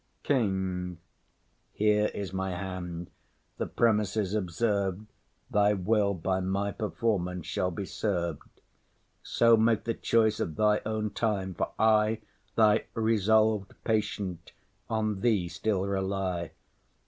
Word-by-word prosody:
KING. 95 -8 0 0.8
Here 105 0 +3
is 100 -2 -4
my 95 -1 -2
hand; 90 -2 -5 0.5
the - - -1
premises 105 -3 +1
observ'd, 100 0 0 0.5
Thy 105 0 +4
will 100 +1 +1
by 95 +2 -1
my 95 +2 -1
performance 95 -6 -2
shall 90 - -1
be 95 +3 -4
serv'd; 85 -7 -3 0.6
So 115 -1 +4
make 110 -1 +2
the 115 - -1
choice 110 -1 +2
of 80 - -2
thy 105 -1 +3
own 110 -1 -1
time, 100 -5 -1
for - - -3
I, 110 0 +3 0.3
Thy 110 -1 +4
resolv'd 110 -2 +2
patient, 100 -5 -2 0.4
on 110 -3 0
thee 105 -7 +2
still 95 +2 -1
rely. 95 -3 -2
100 Hz, 115 wpm, -29 LUFS, 95-110 Hz, 0.8 s, Thy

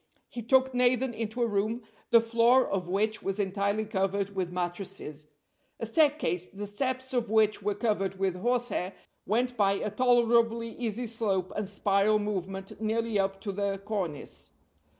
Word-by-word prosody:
He 240 - -6
took 260 +3 +3
Nathan 250 0 +2
into 225 +2 -2
a - - +2
room, 215 +3 -1 0.3
the 230 - +7
floor 235 +3 +4
of 180 -3 -2
which 215 +4 0
was 195 0 -2
entirely 200 +1 0
covered 200 -1 -1
with 185 -2 -2
mattresses. 175 -4 -4 0.5
A - - -2
staircase, 230 - +2
the 205 +2 -6
steps 260 +5 -3
of 240 -3 0
which 215 -1 +3
were 205 0 -1
covered 195 -3 -1
with 190 -1 0
horsehair, 240 -3 -1 0.3
went 245 +4 +1
by 200 -3 +3
a 205 +1 -2
tolerably 235 -1 +3
easy 230 0 -3
slope 210 -5 0
and 210 -2 -2
spiral 200 +1 +2
movement 195 -1 -4
nearly 225 -1 0
up 195 0 0
to 200 - -3
the 200 0 -1
cornice. 185 -9 -4
210 Hz, 155 wpm, -29 LUFS, 195-235 Hz, 0.5 s, the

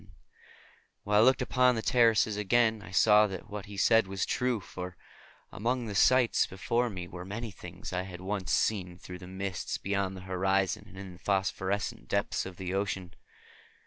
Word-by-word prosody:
And 100 - -21 0.9
when 105 0 +2
I - - +7
looked 130 +3 +5
upon 125 +3 +3
the 110 - -3
terraces 115 -4 +3
again 110 +1 +2
I 90 - -11
saw 105 +3 +5
that 95 -1 -8
what 105 0 -6
he 100 -1 -9
said 115 0 +4
was 95 0 -2
true, 125 -2 0
for 90 -1 -8 0.5
among 120 +3 -1
the 105 - -5
sights 125 +4 +4
before 115 +6 -1
me 90 -4 -6
were 90 -1 -8
many 105 +4 -5
things 90 -1 -9
I 90 - 0
had 90 -1 -8
once 95 0 -3
seen 90 -5 0
through 90 0 -9
the 90 - -10
mists 95 0 -4
beyond 100 -1 -2
the - - -8
horizon 95 +2 0
and 95 - -14
in 95 -2 -8
the 85 - -15
phosphorescent 95 +1 -1
depths - - -1
of 95 -1 -11
ocean. 95 -1 -3
100 Hz, 180 wpm, -30 LUFS, 95-110 Hz, 0.9 s, I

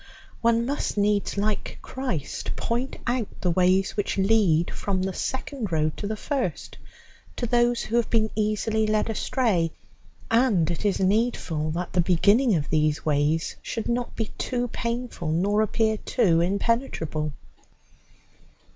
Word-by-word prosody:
One 235 0 +3
must 280 -4 -2
needs, 205 0 +1
like 210 +1 -1
Christ, 185 - -4
point 240 +3 -2
out 240 -3 0
the 180 - +1
ways 185 +2 +3
which 205 -1 -1
lead 195 -5 +3
from 190 -2 -2
the 190 0 -2
second 260 -1 -3
road 155 -1 +1
to 205 - -4
the 215 - -2
first, 270 +4 -3 0.6
to 245 - -2
those 240 0 +2
who 230 - -1
have 235 - +1
been 220 -2 +2
easily 215 +1 0
led 215 +1 +1
astray; 215 - +1 0.6
and 225 -9 +3
it 170 - -4
is 200 - +1
needful 190 -6 +1
that 175 +2 -4
the 180 - +4
beginning 200 +7 +4
of 150 -3 -2
these 155 -1 +1
ways 150 +2 +1
should 225 - -4
not 240 0 -2
be 225 -2 -3
too 245 -1 -1
painful 235 -7 -3
nor 200 +6 +2
appear 220 +1 +1
too 185 -8 +2
impenetrable. 175 - -1
210 Hz, 145 wpm, -25 LUFS, 175-235 Hz, 0.6 s, the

